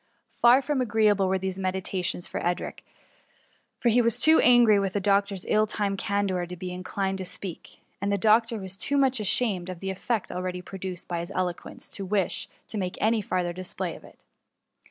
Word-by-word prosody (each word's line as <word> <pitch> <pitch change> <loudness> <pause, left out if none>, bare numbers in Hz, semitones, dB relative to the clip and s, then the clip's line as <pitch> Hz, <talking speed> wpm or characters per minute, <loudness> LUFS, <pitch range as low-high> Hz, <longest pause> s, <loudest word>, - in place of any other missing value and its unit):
Far 245 +3 +5
from 280 -1 0
agreeable 210 -4 +3
were 190 0 +1
these 190 0 -4
meditations; 185 -1 -1
for - - -5
Edric 175 0 -2 1.0
was 235 -1 +3
too 320 +1 +6
angry 240 -4 +6
with 195 -1 -1
the 205 - +1
doctor's 200 -1 +1
ill 215 0 +3
timed 200 -2 -2
candour 195 -3 -1
to 180 - -7
be 180 +1 -6
inclined 190 +1 -3
to - - -3
speak; 180 -1 -8 0.2
and 200 0 0
the 200 - +2
doc 220 +3 +4
tor 230 -1 -4
was 190 -2 -4
too 280 +8 0
much 265 -3 +3
ashamed 200 -3 +1
of 180 -2 -6
the 190 +1 -3
effect 215 +3 -2
already 180 0 -4
produced 185 -2 -6
by 175 -1 -2
his 170 +3 -6
eloquence, 180 -2 -4
to 200 - -6
wish 195 -1 -1 0.2
to 215 - -3
make 180 -2 -3
any 220 +1 +2
farther 180 -3 -1
display 185 0 -4
of - - -14
it. - - -18
195 Hz, 190 wpm, -26 LUFS, 185-215 Hz, 1.0 s, too